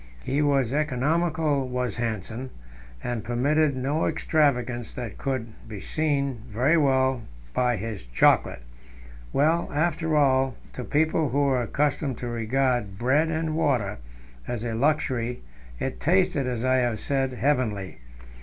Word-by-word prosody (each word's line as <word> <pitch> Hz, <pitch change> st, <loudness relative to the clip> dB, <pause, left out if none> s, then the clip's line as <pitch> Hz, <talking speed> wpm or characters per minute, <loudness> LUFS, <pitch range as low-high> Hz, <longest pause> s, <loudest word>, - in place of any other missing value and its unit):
He 140 Hz, +3 st, 0 dB
was 140 Hz, -4 st, +2 dB
economical, 150 Hz, 0 st, +1 dB
was 125 Hz, -1 st, -2 dB
Hanssen, 115 Hz, +2 st, -3 dB, 0.5 s
and 120 Hz, -3 st, -3 dB
permitted 140 Hz, +5 st, +1 dB
no 140 Hz, +5 st, 0 dB
extravagance; 125 Hz, -7 st, +1 dB
that 120 Hz, -5 st, -6 dB
could 125 Hz, -5 st, -3 dB, 0.2 s
be 105 Hz, -3 st, -6 dB
seen 140 Hz, -3 st, -1 dB
very 125 Hz, +9 st, +2 dB
well 130 Hz, -4 st, +2 dB, 0.3 s
by 125 Hz, -2 st, +1 dB
his 105 Hz, -1 st, -5 dB
chocolate. -, -, +3 dB, 0.7 s
Well, 160 Hz, +4 st, +2 dB
after 160 Hz, +1 st, 0 dB
all, 135 Hz, -3 st, +3 dB, 0.2 s
to 125 Hz, -, -5 dB
people 155 Hz, +2 st, +1 dB
who 140 Hz, +4 st, +1 dB
were 135 Hz, -3 st, +2 dB
accustomed 140 Hz, +1 st, -1 dB
to 120 Hz, -, -5 dB
regard 120 Hz, -3 st, 0 dB
"bread 135 Hz, +8 st, +2 dB
and 160 Hz, -1 st, -1 dB
water" 125 Hz, -, 0 dB, 0.5 s
as 120 Hz, -2 st, -3 dB
a 115 Hz, -1 st, -2 dB
luxury, 125 Hz, -, 0 dB, 0.3 s
it 135 Hz, -, -4 dB
tasted, 175 Hz, -5 st, +2 dB
as 125 Hz, -1 st, -2 dB
I 130 Hz, 0 st, +3 dB
have 120 Hz, -4 st, 0 dB
said, 135 Hz, -2 st, -1 dB
heavenly. 120 Hz, -8 st, -1 dB
130 Hz, 135 wpm, -26 LUFS, 120-150 Hz, 0.7 s, chocolate